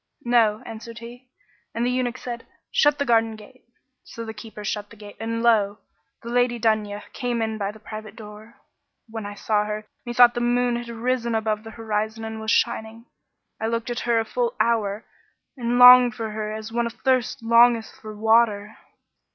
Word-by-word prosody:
'No,' 225 -3 +3
answered 225 +1 -9
he; 240 +2 -11 0.5
and 235 +1 0
the 250 - +1
eunuch 250 -1 -1
said, 240 -2 -7 0.2
'Shut 295 0 +3
the 285 - -1
garden 225 -2 +2
gate.' 220 +5 -16 0.4
So 230 - -8
the 220 - -6
keeper 210 0 -10
shut 205 0 -3
the - - -14
gate, 205 -1 -12
and 230 +1 -3
lo! 210 -3 +3 0.5
the 235 - -7
Lady 245 0 +1
Dunya 215 -2 0
came 245 -2 -2
in 220 -1 -2
by 200 0 -2
the 220 - -15
private 215 -1 -9
door. 215 +1 -12 0.5
When 220 -2 -6
I 205 - -8
saw 210 0 0
her, 210 0 -5 0.2
methought 240 0 +5
the 240 - -3
moon 245 0 +1
had 240 0 -7
risen 235 0 -1
above 215 -1 -1
the 225 - -9
horizon 220 0 -3
and 220 0 -6
was 220 - -4
shining; 220 +1 0 0.6
I 220 - 0
looked 230 +1 -2
at 240 - -3
her 235 -1 +1
a 225 - -1
full 485 - -2
hour 215 -2 0 0.5
and 240 -2 -1
longed 250 -1 +9
for 220 -1 -4
her 215 0 -4
as 215 0 -6
one 235 0 0
athirst 255 +1 -1
longeth 230 0 +4
for 215 -1 -9
water. 220 -1 +2
225 Hz, 185 wpm, -23 LUFS, 215-240 Hz, 0.6 s, longed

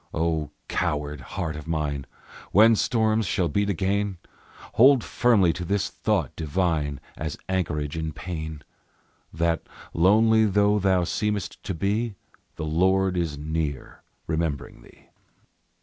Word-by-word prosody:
O 80 -2 0 0.2
coward 75 -1 -2
heart 80 +3 -4
of 75 0 -8
mine! 75 -4 -2 0.4
When 110 +3 +7
storms 110 -2 +1
shall 85 0 +1
beat 100 +7 0
again, 100 +1 0 0.6
Hold 130 +1 +6
firmly 105 -9 +3
to 90 - -5
this 100 +2 0
thought 100 - -1
divine, 80 -3 -1 0.2
As 80 -1 -4
anchorage 85 -6 -1
in 80 -1 -3
pain: 80 -3 -6 0.7
That, 85 +1 0 0.3
lonely 110 +5 +4
though 105 +1 +3
thou 95 -2 +2
seemest 105 +2 -2
to 95 - -3
be, 105 +5 -1 0.4
the 80 - -4
Lord 95 +4 +2
is 85 -4 -1
near, 75 -2 -4 0.2
remembering 80 -3 -3
thee. - - -20
85 Hz, 125 wpm, -25 LUFS, 80-100 Hz, 0.7 s, When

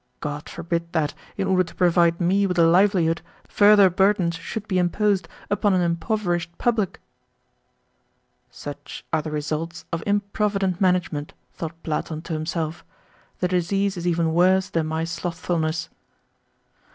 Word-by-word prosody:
God 150 0 -5
forbid 170 0 -3
that, 155 -3 0 0.2
in 195 - 0
order 185 -1 +3
to 165 - -12
provide 170 -2 +3
me 195 +3 +2
with 180 -2 -2
a 170 - +6
livelihood 170 -1 +3 0.3
further 205 -1 +6
burdens 190 -1 +2
should 200 +6 -6
be 185 -2 +1
imposed 195 +2 +1 0.2
upon 205 -1 +2
an 180 - +2
impoverished 175 -1 -1
public!" 225 -6 0 1.5
"Such 145 -1 -9
are 160 - +3
the 155 - -5
results 155 +3 -4
of 165 - -1
improvident 200 -2 0
management!" 180 -5 0 0.2
thought 165 0 -7
Platon 155 0 -3
to 170 - -5
himself. 160 +1 -3 0.6
"The 180 - +3
disease 190 +2 0
is 175 0 -4
even 165 -2 +1
worse 185 +2 +3
than 165 -2 0
my 160 +1 -1
slothfulness." 170 -1 -2
175 Hz, 140 wpm, -23 LUFS, 165-190 Hz, 1.5 s, a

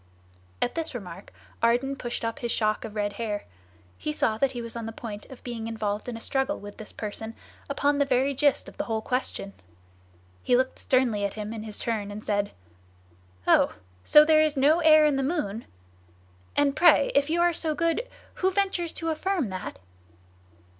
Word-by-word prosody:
At 245 - -1
this 325 -5 -2
remark 190 -4 -8 0.3
Ardan 245 +4 +2
pushed 240 -3 -4
up 230 +3 -3
his 240 -3 -2
shock 215 +2 0
of 220 -2 -7
red 205 -1 -1
hair; 210 -1 -3 0.5
he 150 - -2
saw 215 +8 0
that 270 +1 +2
he 245 - -4
was 230 0 -7
on 230 -1 -4
the - - -4
point 215 -2 -8
of 265 - -13
being 230 -2 -5
involved 215 0 -3
in 235 - -5
a - - -8
struggle 270 +4 -1
with 205 0 -10
this 215 - -8
person 220 +1 -6 0.3
upon 285 +1 +1
the 285 - +4
very 270 +1 +2
gist 285 +1 +2
of - - -12
the - - -2
whole 220 -1 -2
question. 250 -6 -2 0.9
He 245 - +3
looked 260 +1 0
sternly 245 -6 +2
at 200 - -2
him 215 0 -5
in 225 - -5
his 215 -1 -7
turn 215 -3 -2
and 205 +1 -8
said: 205 -1 0 1.0
"Oh! - - +4 0.3
so 300 - +7
there 310 0 +5
is 305 -2 +1
no 295 +5 +5
air 310 -2 +7
in 295 -2 +2
the - - +1
moon? 260 - -2 0.9
And 285 -1 +3
pray, 320 -5 +5
if 285 +1 +3
you 335 +2 +1
are 345 0 +4
so 315 -2 0
good, 335 +10 0 0.3
who 375 - +4
ventures 380 -3 0
to 330 - -2
affirm 330 - -1
that? 185 -1 -6
245 Hz, 195 wpm, -27 LUFS, 215-295 Hz, 1.0 s, so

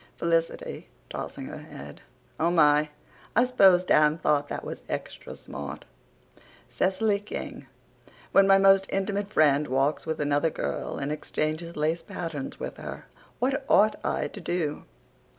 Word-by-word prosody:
(FELICITY, 165 -1 -1 0.2
TOSSING - - -6
HER - - -7
HEAD: 70 +1 -11 0.4
"Oh, 165 - +3
my! 150 -3 +4 0.5
I 240 +3 +5
s'pose 195 -8 +5
Dan 150 -3 +4
thought 145 -3 +1
that - - -5
was - - -6
extra - - -6
smart.") 70 -2 -8 0.8
C 185 - +1
y 210 -2 +3
K 205 - -5
g: 140 - -12 0.7
When 195 0 +6
my 195 0 +7
most 195 0 +5
intimate 200 +1 -2
friend 150 -4 +3
walks 135 +5 0
with 160 - -2
another 145 +2 +2
girl - - -4
and 140 +1 -3
exchanges 155 +2 -3
lace 155 +3 0
patterns 160 -6 -6
with - - -6
her, - - -8 0.3
what 270 +2 0
ought 215 +1 +4
I - - -1
to 205 - -9
do? 170 -4 -2
165 Hz, 150 wpm, -27 LUFS, 150-195 Hz, 0.8 s, my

